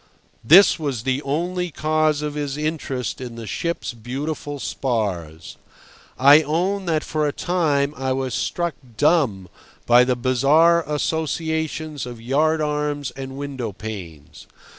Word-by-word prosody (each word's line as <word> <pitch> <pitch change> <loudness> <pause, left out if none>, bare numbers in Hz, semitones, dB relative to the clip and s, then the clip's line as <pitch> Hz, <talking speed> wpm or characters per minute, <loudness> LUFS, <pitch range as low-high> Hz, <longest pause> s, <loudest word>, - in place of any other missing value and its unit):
This 175 - +7
was 135 -7 -3
the 135 +1 0
only 175 +5 -2
cause 155 -1 0
of 150 -1 -3
his 145 -1 -3
interest 150 -6 -3
in 120 -2 -7
the 115 -1 -7
ship's 170 - -3
beautiful 145 +5 -5
spars. 95 - -3 0.6
I 145 +4 +7
own 180 +6 -1
that 160 -2 +1
for 155 -1 -1
a - - 0
time 150 -5 0
I 135 -2 -2
was 130 -1 -2
struck 170 -2 -1 0.2
dumb 135 - +2 0.4
by 120 +1 +6
the 125 0 +1
bizarre 140 +7 +4
associations 160 -1 -2
of 120 -2 -8
yard 155 +7 +1
arms 150 -2 -2
and 135 0 -8
window 135 -5 -4
panes. 90 -8 -9
145 Hz, 135 wpm, -22 LUFS, 125-155 Hz, 0.6 s, This